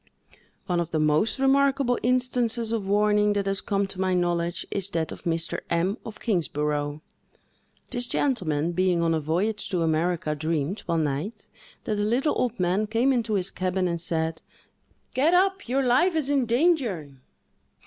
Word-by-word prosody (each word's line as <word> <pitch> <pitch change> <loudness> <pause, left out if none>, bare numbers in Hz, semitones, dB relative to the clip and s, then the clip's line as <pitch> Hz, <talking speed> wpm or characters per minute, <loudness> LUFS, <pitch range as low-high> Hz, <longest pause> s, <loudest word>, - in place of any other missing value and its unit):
One 175 -3 0
of 170 -1 -2
the 160 - -1
most 155 - +2
remarkable 270 -2 +2
instances 245 -2 0
of 220 -4 -2
warning 210 +1 +3
that 200 -1 -1
has 195 -1 -1
come 200 -2 0
to 195 -1 -5
my 185 -1 +1
knowledge, 175 -1 0
is 200 -1 -2
that 165 -4 -2
of - - -10
Mr. 165 -1 -1
M——, 175 +4 +1
of 220 - -9
Kingsborough. 150 -6 -1 0.9
This 245 -1 -2
gentleman, 170 - 0
being 180 -1 +1
on 165 0 +2
a 160 - +1
voyage 190 +8 -1
to 180 -4 0
America, 160 0 0
dreamed, 160 +4 -2
one 165 -2 +1
night, 155 +10 -4 0.4
that 210 -1 -2
a - - +1
little 250 +8 +1
old 245 -3 -1
man 185 +4 +1
came 235 +5 +2
into 230 -4 0
his 195 -1 -1
cabin 185 0 -1
and 170 -1 -2
said, 160 -1 -2 0.7
"Get 310 +7 +3
up! 385 -5 +1
Your 270 +2 +2
life 325 +9 +3
is 290 -3 +1
in 270 -4 +2
danger!" 230 - +1
195 Hz, 170 wpm, -26 LUFS, 170-240 Hz, 0.9 s, warning